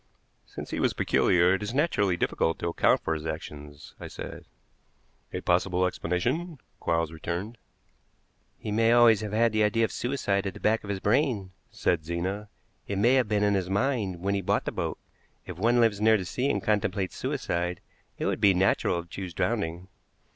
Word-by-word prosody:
"Since -, -, -8 dB
he -, -, -2 dB
was -, -, +2 dB
peculiar, 90 Hz, +1 st, +3 dB
it 95 Hz, -, -1 dB
is 105 Hz, +4 st, -4 dB
naturally 105 Hz, -, +2 dB
difficult 80 Hz, -1 st, 0 dB
to -, -, -3 dB
account 85 Hz, -, +3 dB
for 80 Hz, -, -1 dB
his 80 Hz, 0 st, -4 dB
actions," 75 Hz, -2 st, -8 dB
I -, -, -7 dB
said. -, -, -8 dB, 0.9 s
"A -, -, -4 dB
possible 90 Hz, +1 st, +2 dB
explanation," 125 Hz, -, -2 dB, 0.2 s
Quarles 85 Hz, -1 st, 0 dB
returned. 90 Hz, +8 st, -5 dB, 1.0 s
"He 105 Hz, -, -6 dB
may 115 Hz, +2 st, +3 dB
always 115 Hz, -3 st, +6 dB
have 105 Hz, -2 st, -4 dB
had 115 Hz, +2 st, +3 dB
the 110 Hz, 0 st, +1 dB
idea 115 Hz, +2 st, +2 dB
of -, -, -5 dB
suicide 105 Hz, -6 st, -1 dB
at 95 Hz, -, -5 dB
the -, -, -9 dB
back 110 Hz, +1 st, +1 dB
of 100 Hz, -, -9 dB
his 100 Hz, -1 st, -2 dB
brain," 105 Hz, -3 st, +1 dB, 0.2 s
said 80 Hz, -3 st, 0 dB
Zena. 95 Hz, +5 st, -3 dB, 0.4 s
"It 100 Hz, -, -2 dB
may 120 Hz, +6 st, +4 dB
have 130 Hz, -4 st, +3 dB
been 105 Hz, -1 st, +2 dB
in 105 Hz, 0 st, +3 dB
his 95 Hz, -2 st, -1 dB
mind 100 Hz, -4 st, 0 dB
when 100 Hz, +2 st, 0 dB
he 100 Hz, -, 0 dB
bought -, -, 0 dB
the -, -, -2 dB
boat. -, -, -3 dB, 0.5 s
If 90 Hz, -2 st, -8 dB
one 120 Hz, +4 st, +3 dB
lives 110 Hz, -3 st, +3 dB
near 110 Hz, 0 st, +5 dB
the 95 Hz, -, -5 dB
sea 125 Hz, +9 st, -1 dB
and -, -, -1 dB
contemplates 100 Hz, -3 st, 0 dB
suicide, 85 Hz, +1 st, -2 dB, 0.4 s
it -, -, -3 dB
would -, -, -1 dB
be 100 Hz, -3 st, +5 dB
natural 90 Hz, -2 st, +1 dB
to -, -, -22 dB
choose 90 Hz, -2 st, -7 dB
drowning." 85 Hz, +3 st, -1 dB
100 Hz, 190 wpm, -27 LUFS, 90-110 Hz, 1.0 s, always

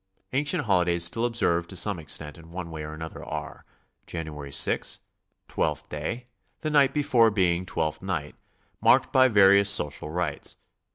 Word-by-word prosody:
Ancient 145 Hz, +4 st, +1 dB
holidays 90 Hz, -4 st, +2 dB
still 115 Hz, +7 st, +1 dB
observed 90 Hz, -8 st, 0 dB
to 95 Hz, -, -7 dB
some 95 Hz, +1 st, +1 dB
ex 75 Hz, -3 st, -1 dB
tent 75 Hz, -1 st, -9 dB
in 80 Hz, 0 st, -15 dB
one 85 Hz, -1 st, -7 dB
way 80 Hz, -1 st, -6 dB
or 75 Hz, +1 st, -7 dB
another 80 Hz, 0 st, -8 dB
are: -, -, -7 dB, 0.4 s
January 75 Hz, -4 st, -6 dB
6, -, -, +1 dB, 0.5 s
Twelfth -, -, -2 dB
Day, 80 Hz, +12 st, -4 dB, 0.4 s
the 155 Hz, -, -2 dB
night 140 Hz, -3 st, +4 dB
before 135 Hz, -6 st, +3 dB
being 90 Hz, -3 st, 0 dB
Twelfth 80 Hz, -3 st, -2 dB
Night, 85 Hz, -7 st, -3 dB, 0.5 s
marked -, -, +4 dB
by 130 Hz, 0 st, +6 dB
various 100 Hz, -3 st, +5 dB
social 75 Hz, -6 st, 0 dB
rites. 90 Hz, +3 st, -2 dB
90 Hz, 160 wpm, -26 LUFS, 80-115 Hz, 0.5 s, by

